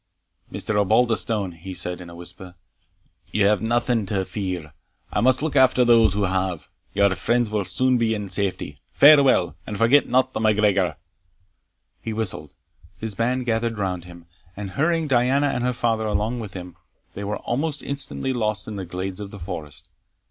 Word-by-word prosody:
"Mr. 105 +2 -3
Osbaldistone," 110 -2 +1
he 85 +3 -9
said, 90 0 -3
in 85 - -10
a 85 - -11
whisper, 90 +1 -9 0.7
"you 105 -2 +1
have 105 -1 +3
nothing 120 0 +1
to 95 -1 -1
fear 90 -8 -5 0.4
I - - +1
must 130 +3 +3
look 155 -3 -2
after 130 -2 +5
those 115 -4 +5
who 105 - 0
have 95 -3 -2 0.3
Your 100 -1 +4
friends 120 +4 0
will 105 -2 -1
soon 125 +8 +1
be 110 -1 +1
in 105 -1 -5
safety 90 -7 -2
Farewell, 135 - +6
and 105 - -4
forget 120 +6 +4
not 130 +1 +2
the - - -2
MacGregor." 105 -7 +2 1.0
He 115 - -4
whistled 95 -10 -3 0.4
his 110 -1 -4
band 125 +4 -1
gathered 115 -1 -1
round 90 -3 -3
him, 85 -1 -13 0.3
and, 100 -2 -5
hurrying 160 - +1
Diana 135 +2 +2
and 125 - -2
her 125 - +1
father 115 -2 0
along 105 +4 -1
with 105 -4 -7
him, 90 -2 -9 0.4
they 100 - -6
were 105 +1 -2
almost 145 +4 -2
instantly 140 -1 -2
lost 105 -6 -1
in 105 -2 -6
the 95 - -5
glades 90 +2 -5
of 100 -1 -6
the 100 - -10
forest. 80 -3 -7
105 Hz, 175 wpm, -23 LUFS, 95-120 Hz, 1.0 s, Farewell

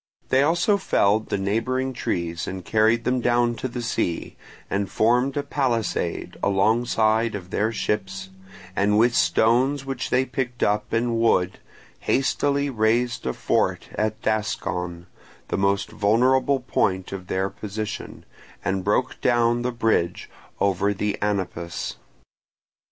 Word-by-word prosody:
They 130 - +4
also 175 +7 +3
felled 110 - +2
the - - 0
neighbouring 125 +7 -1
trees 85 -9 -3
and 95 -2 -6
carried 110 +2 +3
them 125 +1 +1
down 120 0 +2
to - - -3
the 120 -1 -5
sea, 85 -6 -2 0.3
and 100 0 -1
formed 125 +5 +2
a 145 - 0
palisade 125 -7 -1
alongside 110 +2 +2
of 90 -2 -8
their 110 +2 +1
ships, 95 -3 -3 0.4
and 105 +1 +2
with 115 +2 +4
stones 130 +7 +2
which 135 -2 -3
they 130 +1 +2
picked 125 -3 -3
up 105 +1 0
and 115 0 +1
wood 95 -5 +2 0.4
hastily 140 +1 +1
raised 120 - +1
a 65 - 0
fort - - 0
at 110 0 -1
Daskon, 90 -5 -2 0.4
the - - -1
most 100 +1 +1
vulnerable 125 +6 +2
point 95 -6 0
of 95 -2 -6
their 95 +1 -1
position, 105 0 -6 0.4
and 95 -1 0
broke 105 +6 0
down 120 -1 +3
the 125 +1 -1
bridge 110 -7 0 0.3
over 100 +1 +1
the 105 +1 -1
Anapus. 95 -4 -2
110 Hz, 135 wpm, -24 LUFS, 100-125 Hz, 0.4 s, They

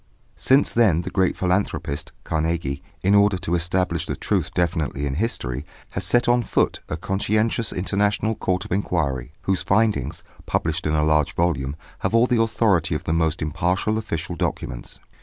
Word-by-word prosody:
Since 135 +2 +3
then 100 -9 +4
the - - -6
great 95 -3 +1
philanthropist, 90 -6 -1
Carnegie, 80 -3 -1 0.2
in 95 +2 +4
order 100 -1 +5
to 85 -1 -3
establish 85 0 0
the - - -2
truth - - -1
definitely 80 -5 0
in 70 - -2
history, 70 - -2 0.3
has 95 - -3
set 120 +7 +3
on 120 0 +4
foot 115 - 0
a 75 - -2
conscientious 110 +5 0
international 100 +3 0
court 95 -3 -1
of - - -11
inquiry, 75 -9 -1
whose 95 -4 +1
findings, 110 +3 +1 0.2
published 80 0 -1
in 75 - +1
a 75 - +2
large 75 -1 +2
volume, 75 -5 0 0.2
have - - 0
all 115 +1 +6
the 120 -2 +2
authority 105 -8 +2
of - - -3
the 80 - -1
most 80 -1 +1
impartial 90 +7 0
official 90 -5 -4
documents. - - -4
90 Hz, 165 wpm, -23 LUFS, 80-105 Hz, 0.3 s, all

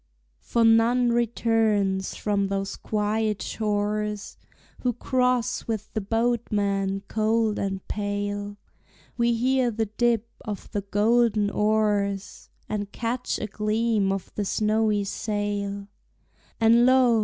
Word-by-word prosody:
For 235 - 0
none 230 +2 +4
returns 220 -5 +1
from 200 -2 0
those 195 0 -2
quiet 215 0 -1
shores, 210 -1 -2 0.4
Who 250 -1 0
cross 250 0 0
with 220 -2 -4
the 220 - -1
boatman 200 -3 0
cold 220 0 +1
and 195 -1 -3
pale; 205 0 -3 0.6
We 235 -1 +2
hear 255 +1 +2
the 225 0 -1
dip 230 +1 0 0.2
of 210 -3 -6
the 205 - -1
golden 210 +1 +2
oars, 205 -2 0 0.2
And 205 -1 -3
catch 240 +3 -2
a - - -3
gleam 215 -1 0
of 195 -2 -4
the 210 - -2
snowy 215 0 +1
sail; 200 -1 -3 0.7
And 230 +2 +5
lo! 255 -3 +5
215 Hz, 115 wpm, -25 LUFS, 205-230 Hz, 0.7 s, And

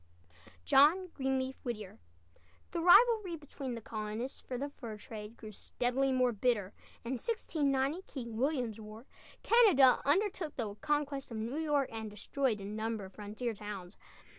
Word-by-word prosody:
JOHN 330 +7 +5
GREENLEAF 265 -3 -2
WHITTIER. 215 -6 -5 0.7
The 340 - -2
rivalry 400 +1 +6
between 280 -4 -6
the 230 - -7
colonists 215 +3 -5
for 250 - -5
the 280 +3 -2
fur 230 -6 -8
trade 210 +1 -9
grew 215 -1 -9
steadily 250 +5 -1
more 255 -1 +3
bitter, 210 -3 0 0.3
and 235 - -3
in 255 - -3
1690 290 - 0
(King 235 -5 -6
William's 245 -3 0
War) 215 +3 -10 0.4
Canada 380 - +6
undertook 345 +1 +1
the 220 -5 -3
conquest 290 +2 -1
of 230 - -5
New 235 +7 -3
York 295 -4 +1
and 220 -1 -4
destroyed 220 +3 -1
a 195 - -7
number 215 0 -3
of 190 - -13
frontier 215 +4 -4
towns. 200 -3 -7
255 Hz, 150 wpm, -33 LUFS, 215-290 Hz, 0.7 s, rivalry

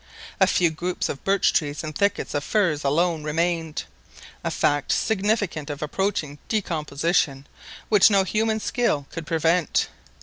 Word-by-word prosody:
A - - +5
few 170 -3 +3
groups 175 +3 -3
of 135 - -5
birch 195 -1 +2
trees 145 -1 -1
and 155 -1 -6
thickets 200 +3 0
of 145 -1 -1
firs 170 -8 +1
alone 165 +3 +1
remained—a 165 0 -4
fact 145 -1 +1
significant 205 -7 0
of 145 0 -4
approaching 150 -3 -2
decomposition, 155 -7 0 0.4
which 210 -1 +6
no 200 -2 +4
human 220 +3 0
skill 215 - 0
could 165 -2 -7
prevent! 165 0 +1
165 Hz, 135 wpm, -24 LUFS, 150-195 Hz, 0.4 s, which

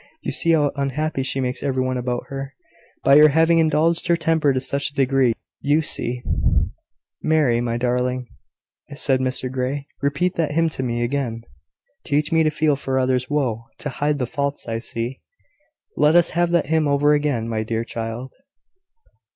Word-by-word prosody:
You - - -2
see 165 - +3
how 145 -3 +3
unhappy 140 +1 -2
she 135 0 -1
makes 125 -1 -2
every 130 -2 0
one 130 0 -1
about 125 -1 -2
her, 135 0 -6 0.5
by 140 +2 +7
her 155 - +9
having 165 +3 +3
indulged 165 +2 +2
her 170 0 +3
temper 160 -3 +2
to 130 - 0
such 140 +2 -1
a 140 - -23
degree. 135 -3 +2 0.3
You 150 +3 +2
see 125 -4 -2 0.5
" - - -36
"Mary, 135 -7 +3
my 120 -1 -1
darling," 125 +1 -1 0.7
said 135 -2 +1
Mr 130 0 -1
Grey, 130 +2 -2 0.2
"repeat 145 +6 0
that 155 -3 0
hymn 165 +1 +2
to 150 - -5
me 120 -2 -1
again: 120 -3 -2 0.6
"`Teach 145 +2 0
me 165 0 +4
to 155 - +3
feel 150 -1 +1
for 135 -1 -2
others' 130 -1 +1
woe, 125 -6 -1
To 150 - -4
hide 145 +2 -1
the 130 - -1
faults 140 +3 -3
I 115 0 -2
see.' 115 +2 -4 0.7
"Let 150 +2 +3
us 175 -1 +5
have 175 +1 +1
that 170 -2 +2
hymn 155 0 +1
over 145 +1 +3
again, 145 -6 0
my 110 -1 -2
dear 110 +1 -2
child." 115 +2 -6
140 Hz, 180 wpm, -22 LUFS, 125-150 Hz, 0.7 s, her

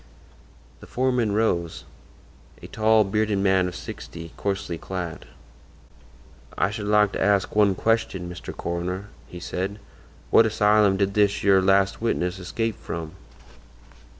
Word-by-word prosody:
The - - -13
foreman 125 -4 0
rose—a 85 -6 -5
tall, 110 0 +3
bearded 105 +1 0
man 95 -2 +2
of 90 - -6
sixty, 85 0 -9
coarsely 95 -4 -3
clad. 90 -2 -6 1.3
"I 95 - +1
should 105 -1 -5
like 105 -1 +4
to - - -4
ask 100 -1 +2
one 105 -2 +4
question, 110 -4 0
Mr. 90 0 -7
Coroner," 90 +4 -4 0.2
he 90 - -9
said. 95 +3 -4 0.5
"What 115 - +6
asylum 105 -2 +3
did 100 0 0
this 105 -1 +2
yer 95 -1 +5
last 95 +2 +2
witness 90 -5 -1
escape 115 +5 -3
from?" 80 -2 -6
100 Hz, 125 wpm, -24 LUFS, 90-105 Hz, 1.3 s, What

